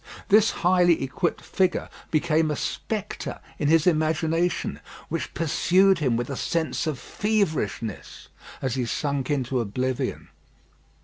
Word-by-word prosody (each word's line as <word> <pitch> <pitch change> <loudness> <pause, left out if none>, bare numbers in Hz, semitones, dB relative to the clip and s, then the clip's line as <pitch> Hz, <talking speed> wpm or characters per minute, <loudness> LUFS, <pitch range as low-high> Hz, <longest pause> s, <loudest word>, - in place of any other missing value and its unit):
This 215 +1 +6 0.2
highly 175 -4 +4
equipped 140 +7 -1
figure 185 -1 0 0.2
became 155 0 +2
a 150 - 0
spectre 215 +6 -4 0.2
in 145 - +1
his 160 0 +4
imagination, 160 +1 +1 0.3
which - - -4
pursued 180 +5 +3
him 130 -7 +1
with 120 +3 -3
a - - -2
sense 165 +3 -1
of 150 -4 -1
feverishness 160 - -2 0.4
as 130 -3 0
he 125 -2 -1
sunk 140 +1 -2
into 130 -3 0
oblivion. 125 +3 -2
155 Hz, 125 wpm, -25 LUFS, 130-175 Hz, 0.4 s, This